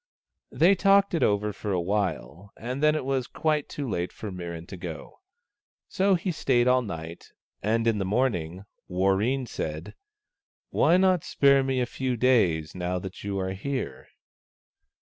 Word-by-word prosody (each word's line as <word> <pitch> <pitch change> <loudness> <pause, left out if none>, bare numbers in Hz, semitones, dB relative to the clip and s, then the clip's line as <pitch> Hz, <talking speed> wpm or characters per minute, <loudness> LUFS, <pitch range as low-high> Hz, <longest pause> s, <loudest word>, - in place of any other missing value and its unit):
They 175 +5 +5
talked 195 0 +4
it 165 - 0
over 105 0 +1
for 105 +1 -5
a 90 - +1
while, 95 - -2
and 125 +5 -5
then 150 0 +4
it 155 - -2
was 135 -2 -1
quite 155 -2 -1
too 140 -2 -5
late 90 -5 -2
for 105 - -7
Mirran 85 -2 -6
to 95 - -7
go. 85 -3 -8 0.7
So 195 0 +2
he 180 +2 -2
stayed 125 -6 +1
all 125 0 +4
night, 85 -6 -7 0.3
and 115 +2 +1
in 115 -3 +2
the - - 0
morning 95 -5 -1 0.2
Warreen 95 +8 +1
said, 80 -7 -5 0.4
" - - -67
Why 175 - +4
not 185 -3 +3
spare 140 -1 +4
me 130 -1 0
a - - +1
few 130 0 -3
days, 95 -11 +2
now 90 0 -2
that 95 +1 -7
you 100 -1 -3
are 95 0 -2
here 110 - -4
110 Hz, 165 wpm, -26 LUFS, 90-135 Hz, 0.7 s, They